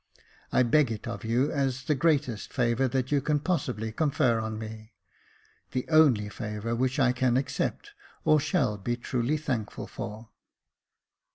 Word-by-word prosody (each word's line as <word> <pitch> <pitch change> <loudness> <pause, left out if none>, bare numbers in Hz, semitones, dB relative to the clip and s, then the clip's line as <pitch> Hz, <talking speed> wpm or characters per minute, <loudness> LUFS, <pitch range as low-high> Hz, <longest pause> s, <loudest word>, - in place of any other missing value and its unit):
I 130 - +4
beg 130 +1 +3
it 110 -1 -5
of 115 -4 -5
you 120 +5 +1
as 130 -2 -1
the 150 - +1
greatest 140 -6 0
favour 125 0 +1
that 130 +1 -1
you 145 -1 +3
can 150 +2 +1
possibly 130 -10 -2
confer 130 -3 +2
on 110 0 -3
me 110 0 -8 0.4
— - - -34
the 130 -1 -2
only 145 -10 +5
favour 105 +1 -4
which 130 +3 0
I 130 -2 +4
can 125 0 +2
accept, 140 - -2 0.3
or 155 - +5
shall 140 - 0
be 120 +5 -1
truly 125 +4 -1
thankful 125 -9 -3
for." 110 +2 -7
125 Hz, 160 wpm, -28 LUFS, 110-140 Hz, 0.4 s, only